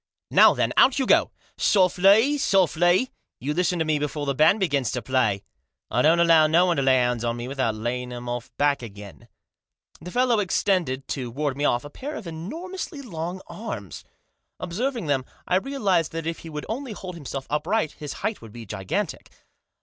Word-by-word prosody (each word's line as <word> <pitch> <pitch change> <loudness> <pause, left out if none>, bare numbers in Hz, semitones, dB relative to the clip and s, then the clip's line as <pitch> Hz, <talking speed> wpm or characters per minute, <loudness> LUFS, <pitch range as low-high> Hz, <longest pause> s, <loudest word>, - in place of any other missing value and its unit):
" - - -53
Now, - - +7
then, - - 0
out 265 - +6
you 270 - +1
go! - - +4 0.2
" - - -34
"Softly! 195 +7 +4
softly! 185 - +3 0.3
You 140 +5 -2
listen 180 +2 +1
to 160 - 0
me 155 -1 +1
before 150 0 -3
the 140 - 0
band 155 +10 +4
begins 140 - +1
to 125 - -2
play. 110 -6 +1 0.5
I 120 - +2
don't 160 +5 +4
allow 165 -2 +6
no 170 +3 +4
one 175 -3 +1
to - - +2
lay 130 -1 +4
hands 125 -2 +1
on 120 0 -1
me 120 +1 -5
without 130 -5 -1
laying 125 +3 -3
of 120 0 -7
'em 120 0 -4
back 145 -1 +2
again." 100 -4 -11 0.7
The 175 - -8
fellow 245 +1 +2
extended, 175 -8 0
to 130 -4 -3
ward 140 +2 -2
me 145 +1 -1
off, 120 0 +1
a 145 - -9
pair 290 - -6
of 220 - -7
enormously 295 - -6
long 175 -4 -5
arms. 105 - -7 0.6
Observing 235 +4 -3
them, 140 -3 0 0.2
I 180 - +3
realised 195 - 0
that 165 -1 -4
if 165 0 -3
he 165 - -10
would 150 -1 -6
only 245 +1 -4
hold 185 -2 -7
himself 140 -4 -6
upright 155 +3 0
his 150 -2 -8
height 215 0 -2
would 115 -2 -11
be 115 0 -9
gigantic. 95 -2 -4
160 Hz, 195 wpm, -24 LUFS, 130-190 Hz, 0.7 s, Now